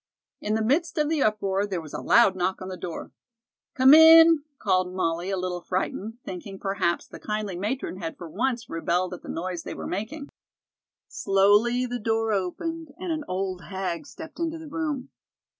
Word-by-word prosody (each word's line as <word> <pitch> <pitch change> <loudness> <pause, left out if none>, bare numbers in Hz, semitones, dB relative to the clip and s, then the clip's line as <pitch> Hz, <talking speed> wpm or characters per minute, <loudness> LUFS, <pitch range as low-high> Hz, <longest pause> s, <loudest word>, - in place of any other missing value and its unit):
In 210 +1 -1
the 220 - 0
midst 305 +10 +1
of 300 -1 +1
the 315 -3 0
uproar 205 -2 +1
there 190 -3 -3
was 155 -3 -10
a - - -4
loud 230 -5 +5
knock 185 +1 -1
on 185 - -7
the 185 - -5
door. 175 -2 -7 0.6
"Come 265 +1 +7
in," 325 0 +9 0.2
called 185 -5 +1
Molly, 175 0 -1
a 195 - -1
little 180 -1 -3
frightened, 195 +5 -3
thinking, 195 +2 -7
perhaps, 195 -3 -1
the - - -12
kindly 210 -3 -3
matron 210 +2 -3
had 165 -3 -6
for 175 - -8
once 235 +6 -2
rebelled 175 +2 -1
at 180 - -8
the - - -11
noise 175 0 -4
they - - -7
were - - -7
making. 270 - -5 0.8
Slowly 205 +6 +3
the 245 0 -4
door 225 0 0
opened 290 - -3
and 360 0 -4
an 310 -1 -2
old 185 -2 -3
hag 185 - -4
stepped 320 +3 -11
into 330 -1 -2
the 320 -1 -10
room. 300 -4 -3
205 Hz, 185 wpm, -26 LUFS, 185-275 Hz, 0.8 s, in